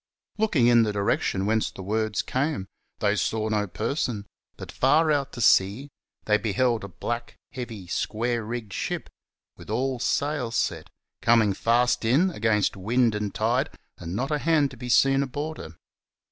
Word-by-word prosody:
Looking 185 - +3
in 120 -1 +6
the 110 -2 +1
direction 100 -1 0
whence 110 +1 +1
the 95 - -10
words 110 +2 -1
came, 140 -5 -1 0.4
they - - +2
saw 110 0 -1
no 105 -1 0
person; 115 - -2 0.3
but - - -8
far 155 +4 +3
out 140 -2 0
to 120 - -6
sea, 105 +7 +3 0.4
they 105 0 +3
beheld 115 +1 0
a - - -5
black, 120 +3 -5 0.2
heavy, 115 -7 -7
square 115 +6 -1
rigged 110 -2 -5
ship, - - -4 0.5
with - - -13
all 130 +3 -1
sail 140 0 0
set, 115 - -2 0.3
coming 110 -3 +4
fast 120 +4 +2
in, 145 +12 +3
against 105 - +1
wind 115 +4 +1
and 105 -1 -3
tide, - - +1 0.3
and 85 +2 -5
not 135 +6 -2
a 150 - +1
hand 150 -3 +2
to - - -10
be 125 +1 -7
seen 135 +3 +4
aboard 145 +4 -4
her. 80 0 -9
120 Hz, 165 wpm, -25 LUFS, 105-135 Hz, 0.5 s, in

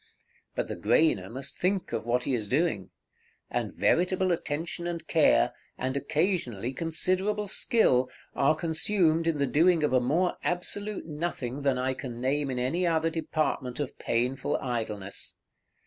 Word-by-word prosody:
But - - -1
the - - -4
grainer 100 - +2
must 135 +3 -6
think 190 +1 0
of 115 - -3
what 125 +1 +2
he 135 - -1
is 110 -4 -1
doing; 130 - 0 0.6
and - - -1
veritable 185 +1 +2
attention 170 +1 -2
and 170 -2 -4
care, 145 - +4 0.2
and 130 +1 -2
occasionally 140 - -1
considerable 185 +7 0
skill, 160 - +2 0.2
are 140 +3 +3
consumed 165 0 +1
in 165 -2 +1
the 140 - +2
doing 165 +4 +3
of 150 - +1
a 130 - +4
more 165 +9 +1
absolute 205 +4 -2
nothing 150 -5 -4
than 135 -2 +2
I 130 +1 0
can 125 -2 -7
name 135 +3 0
in 130 - -2
any 155 +9 +1
other 165 0 +1
department 155 -5 -2
of 145 -3 -4
painful 125 +3 0
idleness. 110 -6 -4
150 Hz, 150 wpm, -28 LUFS, 125-175 Hz, 0.6 s, care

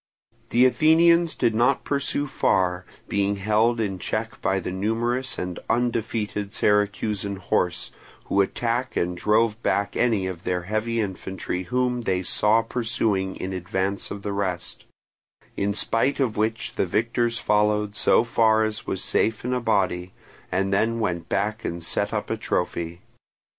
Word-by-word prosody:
The 125 +2 +5
Athenians 165 +4 +4
did 120 -3 +1
not 125 +5 +2
pursue 140 0 -1
far, 90 -9 +1 0.2
being 100 0 0
held 110 +4 +2
in 95 -4 -2
check 110 +4 -3
by 95 0 +1
the 90 - -4
numerous 120 +7 -1
and 90 -1 -4
undefeated 110 -3 -1
Syracusan 105 -1 +1
horse, 90 -2 -1 0.3
who 100 - +2
attacked 120 +5 -1
and 90 +1 0
drove 110 +4 +2
back 100 -3 0
any 110 -6 +2
of 90 -2 -5
their 90 -1 -1
heavy 110 +4 -1
infantry 95 -2 -3
whom 125 +2 0
they 95 -4 0
saw 110 +5 +2
pursuing 110 -5 -1
in 95 +1 -5
advance 95 +2 -2
of 100 0 -7
the 100 - -2
rest; 90 -3 -3 0.7
in 100 +1 0
spite 115 +7 +1
of 125 -5 +1
which 110 +2 -2
the - - +1
victors 115 +4 0
followed 105 -1 +1
so 110 - +4
far 110 -2 +3
as 110 0 -3
was 95 - -2
safe 110 +1 0
in 125 - 0
a 125 - 0
body, 95 -5 0 0.4
and 95 +1 0
then 115 +4 +1
went 85 -6 -2
back 105 +3 -1
and 85 0 -4
set 100 +5 -1
up 105 0 -3
a 110 - -1
trophy. 85 -4 -2
105 Hz, 155 wpm, -24 LUFS, 95-115 Hz, 0.7 s, The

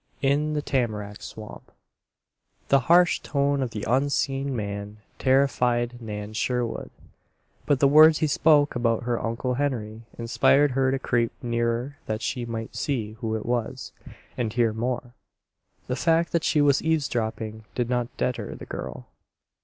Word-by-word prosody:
IN 145 +3 +2
THE 150 -1 -1
TAMARACK 105 -7 -2
SWAMP 110 -1 -10 1.0
The 140 - +6
harsh 175 0 +5
tone 140 -1 0
of 130 - -1
the 105 -2 -6
unseen 135 +1 0
man 100 -1 -5 0.2
terrified 125 -3 +2
Nan 105 -1 -6
Sherwood; 120 +1 -2 0.8
but 145 -3 +3
the 140 - +5
words 155 +2 +7
he - - +1
spoke 150 0 +4
about 115 -1 +1
her 120 -1 -1
Uncle 115 +3 -2
Henry 120 -5 -2 0.2
inspired 135 +4 +3
her 130 +1 +2
to 135 - +1
creep 120 -3 0
nearer 120 +3 -1
that 110 0 -3
she 120 +1 -2
might 115 -1 -5
see 120 -8 -2
who 110 -3 -2
it 110 - -4
was, 120 -2 -2 0.4
and 115 -3 -2
hear 115 -2 +2
more. 120 +2 -3 0.7
The 125 - -2
fact 165 +3 +2
that 170 -2 +1
she 150 - +2
was 140 -2 +4
eavesdropping 110 -8 -2
did 120 -2 0
not 125 -1 0
deter 125 -1 -2
the - - -10
girl. - - -7
125 Hz, 150 wpm, -25 LUFS, 115-140 Hz, 1.0 s, words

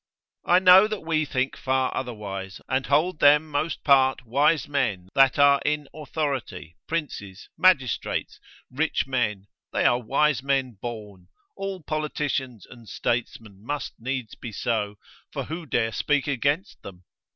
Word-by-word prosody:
I 175 - +6
know 185 +2 +7
that 215 -1 -4
we 160 -1 0
think 130 -1 -1
far 130 0 -1
otherwise, 100 -6 -5
and 130 +1 -1
hold 155 +4 +2
them 150 +2 +5
most 155 +2 -2
part 130 -3 +4
wise 145 +5 +2
men 115 -11 -1
that 135 -3 +4
are 140 -1 +5
in 150 -1 -1
authority, 135 - -4
princes, 105 - -5
magistrates, 145 - +1 0.3
rich 155 +5 0
men, 110 -7 -1 0.3
they - - 0
are 120 +1 +3
wise 140 +2 +1
men 135 -1 0
born, 105 -6 -8 0.3
all 195 -3 -5
politicians 145 - -3
and 120 -3 -14
statesmen 110 -4 -3
must 145 +5 -4
needs 130 -1 -4
be 120 - -8
so, 105 -1 -2 0.4
for - - -4
who 160 +1 -7
dare 115 -3 0
speak 145 +4 0
against 145 - -1
them? 90 -2 -11
135 Hz, 140 wpm, -25 LUFS, 115-150 Hz, 0.4 s, know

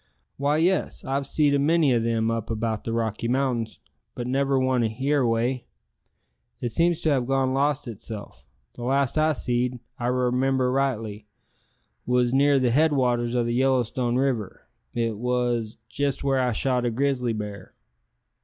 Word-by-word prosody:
"Why, 145 +2 +1
yes, 180 +4 +1
I've 135 +1 -1
seed 145 -1 +2
a 140 - +3
many 155 -1 +3
o' 120 - +3
them 115 0 0
up 115 -2 -3
about 110 -1 -2
the 115 - -2
Rocky 115 0 -1
Mountains, 120 -4 -1 0.4
but 120 - -4
never 135 +2 +1
one 130 -1 +2
here 135 +6 0
away. 120 +1 0 0.9
It 120 - -2
seems 170 +7 +1
to 155 - +2
have 130 -4 +1
gone 135 -1 +1
lost 145 0 0
itself. 105 - -8 0.3
The - - -11
last 135 +1 +1
I 155 0 +3
seed, 125 -1 -1
if 120 - -12 0.2
I 120 - -1
remimber 125 +1 +1
rightly, 110 -6 -2 0.8
wos 125 0 +2
near 140 +1 +4
the 125 -2 +2
head 155 +5 +4
waters 120 -3 +1
o' 120 - +2
the 120 - -1
Yellowstone 125 -1 +1
River, 125 -6 -1 0.3
it 115 -3 -1
wos 120 -2 -1
jest 140 -1 -2
where 135 -1 +2
I 125 -1 +1
shot 125 +2 0
a 120 - +1
grizzly 125 -1 0
bar." 105 -3 -7
125 Hz, 165 wpm, -25 LUFS, 115-135 Hz, 0.9 s, near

